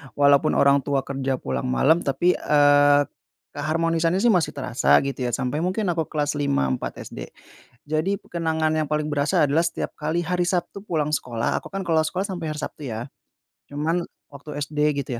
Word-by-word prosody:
walaupun 140 -1 +4
orang 140 0 +5
tua 135 0 -1
kerja 135 -1 -2
pulang 65 - -3
malam 150 - +3
tapi, 160 +5 +1
eee, 145 -1 +5 0.5
keharmonisannya 165 +4 0
sih 240 - +5
masih 180 -4 +1
terasa 135 -3 +2
gitu 135 -2 -3
ya 120 - -2
sampai 130 +3 -2
mungkin 185 +3 0
aku 165 -2 -2
kelas 145 -1 -2
5, 140 - +1
4 - - -4
SD. - - -8 0.6
Jadi, 160 +6 0
kenangan 160 -2 0
yang 155 -1 0
paling 150 0 0
berasa 145 0 +2
adalah 155 +4 +2
setiap 170 - -3
kali 155 +3 -2
hari 175 +1 0
Sabtu 180 +2 -2
pulang 155 -6 0
sekolah, 120 -4 -2
aku - - -11
kan 195 - -3
kalau 160 -2 +3
sekolah 185 +5 -2
sampai 175 -5 -4
hari 150 - -5
Sabtu 150 - -6
ya. 110 +3 -5 0.6
Cuman 160 +4 -1 0.2
waktu 145 +1 -9
SD 150 +1 0
gitu 140 -2 -4
150 Hz, 180 wpm, -23 LUFS, 140-165 Hz, 0.6 s, orang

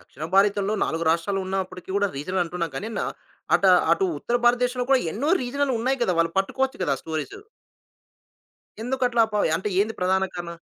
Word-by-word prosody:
దక్షిణ 155 - -10
భారతంలో 200 +1 +3
4 165 +1 -2
రాష్ట్రాలు 170 +4 0
ఉన్నప్పటికి 185 -1 -4
గూడా 200 0 +2
రీజనంటున్నాం 175 +2 -2
గాని, 215 - -4 0.7
అట - - +2 0.3
అటు 180 - +2
ఉత్తర 240 +11 0
భారతదేశంలో 245 +1 +2
కూడా 265 -1 +5
ఎన్నో 270 +8 -2
రీజనల్‌ 275 +2 -1
ఉన్నాయి 260 +3 0
గదా! 185 - +2
వాళ్ళు 165 0 +2
పట్టుకోవచ్చు 265 +7 -1
గదా! 140 - +1
స్టోరీస్. 160 - -4 1.5
ఎందుకట్లా 245 -1 +1
పా 210 - 0 0.2
అంటే 190 +5 -3
ఏంది 220 +2 0
ప్రధాన 190 +1 +2
కారణం? 170 -1 -6
200 Hz, 150 wpm, -24 LUFS, 180-245 Hz, 1.5 s, కూడా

